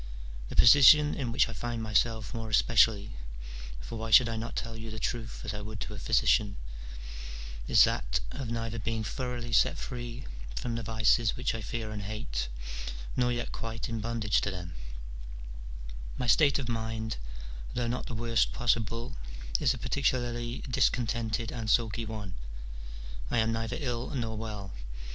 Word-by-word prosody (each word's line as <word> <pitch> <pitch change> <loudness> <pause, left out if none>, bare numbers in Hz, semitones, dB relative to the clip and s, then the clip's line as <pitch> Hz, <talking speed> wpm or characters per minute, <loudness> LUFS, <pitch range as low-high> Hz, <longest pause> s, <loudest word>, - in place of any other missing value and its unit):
The - - -6
position 145 +4 +9
in 125 -5 -2
which 120 - +4
I 115 - -6
find 120 -1 -3
myself 110 +1 +1
more 115 -2 -4
especially 110 - +4 0.7
(for 110 - -6
why 115 0 -3
should 120 +2 +8
I 115 - -2
not 115 +1 -4
tell 115 0 -3
you 115 0 -6
the 110 - -6
truth 115 +1 -3
as 105 - -2
I 105 - -4
would 105 -1 -6
to - - -4
a 105 - -6
physician), 100 +2 +3 1.1
is - - +8
that - - +1
of 135 -4 -4
neither 115 0 -2
being 110 +1 -1
thoroughly 120 0 -3
set - - +4
free 120 0 -5 0.3
from 120 - -2
the 115 - -1
vices 110 0 +3
which - - 0
I 115 - -3
fear 110 +1 -3
and 105 -1 -4
hate, - - -3 0.7
nor 125 -1 +3
yet 120 0 -2
quite 115 0 -4
in 115 -1 -2
bondage 110 -2 +1
to - - 0
them: 90 -3 -5 1.4
my 125 - -1
state 140 +2 +5
of 135 -4 -3
mind, 110 -1 -2 0.6
though 120 -1 0
not 125 +2 -2
the 120 - -4
worst 115 0 +2
possible, 115 -1 0 0.4
is - - +3
a - - -7
particularly 120 -3 0
discontented 120 -3 +1
and 115 -3 -3
sulky 115 0 +2
one: 105 -4 -5 1.0
I - - +1
am 110 0 +3
neither 115 0 -1
ill 125 -4 -2
nor 115 -3 -1
well. 105 -4 -5
115 Hz, 165 wpm, -30 LUFS, 110-120 Hz, 1.4 s, position